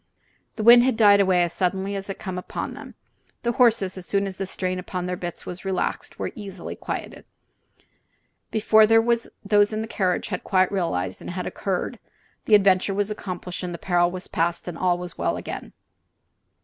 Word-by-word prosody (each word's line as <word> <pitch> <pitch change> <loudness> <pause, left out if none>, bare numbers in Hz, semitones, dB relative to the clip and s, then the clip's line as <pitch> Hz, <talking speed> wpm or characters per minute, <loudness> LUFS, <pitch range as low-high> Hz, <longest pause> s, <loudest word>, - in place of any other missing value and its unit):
The 215 - -3
wind 240 +2 +9
had 255 -3 +1
died 205 -3 +6
away 185 -3 +4
as 170 - -2
suddenly 190 +2 -1
as 195 0 -5
it 195 - -4
came 185 -1 -5
upon - - -5
them. - - -11 0.5
The 235 - +1
horses, 225 -7 +2
as 180 - -8
soon 200 0 +1
as 190 -1 -6
the 195 - -3
strain 185 -1 -2
upon 180 0 -4
their 180 0 -2
bits 175 -1 -6
was 180 0 -7
relaxed, 190 -2 -2
were - - -3
easily 200 -6 -7
quieted. - - -6 1.3
Before 220 0 +5
those 230 +1 +3 0.4
in 215 0 -2
the - - -6
carriage 185 -5 -1
had 180 -3 -4
quite 185 -1 +2
realized 95 - -2
what - - -7
had 180 0 -4
occurred 195 +4 -3 0.5
the 215 - +6
adventure 195 -1 +3
was 205 +1 0
accomplished, 180 -3 -5
the 175 -2 -4
peril 175 -1 +2
was 185 +1 -6
past, 170 +2 -1
and 175 - -4
all 180 +1 +1
was 175 -1 -7
well - - 0
again. - - -7
190 Hz, 185 wpm, -24 LUFS, 180-210 Hz, 1.3 s, wind